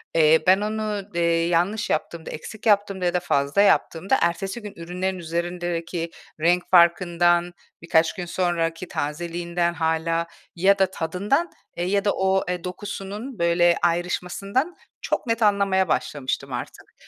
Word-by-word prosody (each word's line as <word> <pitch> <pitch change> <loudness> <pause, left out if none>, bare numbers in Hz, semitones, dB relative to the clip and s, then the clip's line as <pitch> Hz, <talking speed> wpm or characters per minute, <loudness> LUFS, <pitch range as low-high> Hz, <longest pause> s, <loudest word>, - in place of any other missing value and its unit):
eee, 160 0 +6
ben 190 +2 +5
onu, 215 -1 -2
eee, 170 -1 +2
yanlış 180 +5 0
yaptığımda, 160 +1 -2
eksik 210 +7 -9
yaptığımda 200 -3 +2
ya 175 - +1
da 180 - +2
fazla 140 +1 +1
yaptığımda 195 +2 +2
ertesi 190 +6 -1
gün 210 -1 -8
ürünlerin 180 +3 -3
üzerindeki 170 0 -3 0.3
renk 175 +3 +2
farkından, 175 0 +4 0.3
birkaç 160 -1 +2
gün 180 -3 -5
sonraki 175 -1 -1
tazeliğinden 170 +3 -2
hâlâ 165 0 0 0.3
ya 195 +3 +3
da 190 -1 +3
tadından, 200 - -1 0.3
eee, 175 - -1
ya 200 +2 0
da 205 - +4
o, 190 0 +1
eee, 180 -1 -3
dokusunun 205 +6 -6
böyle 170 0 +3
ayrışmasından 180 - -1 0.3
çok - - -2
net 230 0 0
anlamaya 200 -3 +3
başlamıştım 145 -4 -2
artık. - - -7
175 Hz, 135 wpm, -24 LUFS, 170-195 Hz, 0.3 s, eee